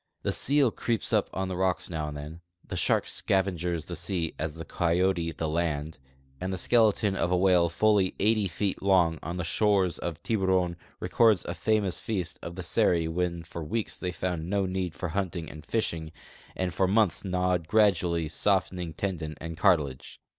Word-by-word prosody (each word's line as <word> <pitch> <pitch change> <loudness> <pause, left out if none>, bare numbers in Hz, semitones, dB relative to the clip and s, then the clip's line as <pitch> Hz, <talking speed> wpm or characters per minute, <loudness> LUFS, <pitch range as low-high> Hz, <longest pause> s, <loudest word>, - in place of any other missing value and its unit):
The - - 0
seal 140 -3 +3
crec))s 115 -1 -2
up - - +2
on 95 0 -2
the 95 - -3
rocks 95 0 0
now 80 -3 -3
and 75 -1 -6
then, 75 +3 -8 0.3
the - - -5
shark - - +2
scavengers 90 -4 -1
the 85 - -6
sea 85 -1 -2
as 75 0 -3
the 80 0 -7
coyote 85 0 +1
the 80 +1 -3
land, 80 -2 -2 0.4
and 95 +1 -3
the 95 - -2
skeleton 105 -1 +3
of 85 - 0
a 90 - +3
whale 90 -2 +4
fully 100 +1 +2
80 105 0 +3
feet 95 +2 -2
long 90 -5 +3
on 85 +4 -5
the 90 - -2
shores 95 0 +2
of 85 -2 -5
Tiburon 95 -5 +1 0.2
records 110 -6 +3
a 85 - -3
famous 100 -1 0
feast 90 -6 -3
of 85 - -7
the 95 - -5
Seri 85 -1 +2
when 85 0 -2
for 85 0 -7
weeks 110 +7 -2
they 90 - -2
found 90 -2 -3
no 100 0 +1
need 90 -3 -2
for 90 - -4
hunting 90 -2 -3
and 75 -1 -10
fishing 80 -7 -2 0.4
and 90 -2 -2
for 95 - +2
months 105 -1 +2
gnawed 90 -3 0
gradually 90 -6 +3
softening 90 0 0
tendon 80 -5 -3
and 80 0 -6
cartilage. 70 -6 +1
90 Hz, 180 wpm, -28 LUFS, 85-95 Hz, 0.4 s, whale